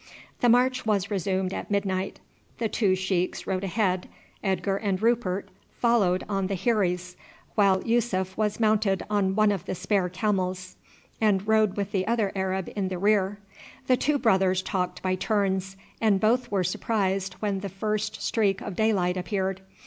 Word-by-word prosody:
The 245 - +3
march 250 +2 +3
was 210 -2 0
resumed 190 -1 -1
at - - -5
midnight. 195 -2 -1 0.4
The 230 - 0
two 200 -3 +2
sheiks 185 -1 -1
rode 190 0 -2
ahead, 185 -2 0 0.3
Edgar 195 0 0
and 200 -3 -1
Rupert 220 -4 0 0.3
followed 205 -7 +2
on 195 -2 -1
the 195 - -2
heiries, 180 -6 +1 0.4
while 195 -3 +3
Yussuf 205 -6 0
was 210 0 -1
mounted 215 -3 +2
on 195 -2 +1
one 215 -1 +4
of 195 -3 -3
the - - -3
spare 185 0 0
camels, 185 -1 -2 0.5
and 205 -2 +2
rode 220 -2 +3
with 200 0 -2
the 190 -1 -1
other 225 -4 +1
Arab 190 -1 -1
in 200 -2 -1
the 185 -1 -3
rear. 200 0 +2 0.5
The 255 - +4
two 295 +3 +1
brothers 190 -6 +2
talked 180 -3 -2
by 185 0 +1
turns, 195 -1 -1 0.2
and 210 -4 +3
both 240 +4 +2
were 195 -2 +1
surprised 195 0 -1
when 200 -2 -2
the 200 0 -5
first 210 +3 -3
streak 200 -4 +1
of 200 - -6
daylight 190 -4 +1
appeared. 190 0 -2
195 Hz, 165 wpm, -26 LUFS, 185-215 Hz, 0.5 s, one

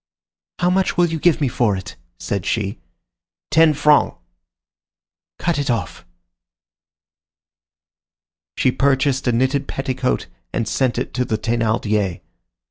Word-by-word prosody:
"How 180 0 +2
much 190 +1 +1
will 175 - +5
you 165 -1 -3
give 165 0 +3
me 145 - +1
for 115 -5 +1
it?" 95 - -8 0.2
said 100 +5 -3
she. 100 -3 -2 0.7
"Ten 160 0 +5
francs." 150 +1 +4 1.2
"Cut 170 -3 -1
it 140 - -2
off." 100 -7 -2 2.5
She 130 - +3
purchased 135 0 +1
a - - +4
knitted 130 +4 +1
petticoat 130 -1 -2 0.3
and 115 - -2
sent 130 0 0
it 125 - -3
to 125 - 0
the 110 -3 -1
Thénardiers. 110 -4 0
130 Hz, 125 wpm, -20 LUFS, 110-145 Hz, 2.5 s, will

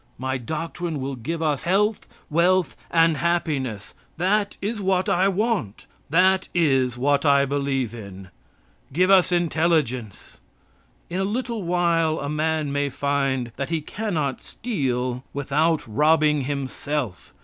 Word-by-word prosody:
My 130 0 -2
doctrine 160 +4 -4
will 135 +1 -3
give 160 +8 -4
us 150 -3 0
health, 205 +4 +1 0.2
wealth, 175 0 +2
and 165 -2 +3
happiness. 140 -10 -1 0.2
That 200 +4 +1
is 210 +2 -3
what 190 -1 +1
I 185 +2 +3
want. 200 - -1 0.2
That 185 +4 +3
is 135 -7 +2
what 140 +3 +2
I 140 -2 +4
believe 135 -4 -1
in. 100 -4 -9 0.6
Give 180 +7 +3
us 185 -2 +5
intelligence. 155 - 0 0.7
In 180 - -2
a - - +1
little 230 +2 -2
while 170 -3 +1
a 140 - -4
man 155 -1 0
may 145 0 0
find 135 -3 -1
that 140 - -3
he 165 -1 0
cannot 155 -5 -3
steal 130 - -2
without 145 +2 0
robbing 150 +3 +3
himself. 140 -5 -4
155 Hz, 130 wpm, -23 LUFS, 135-175 Hz, 0.7 s, us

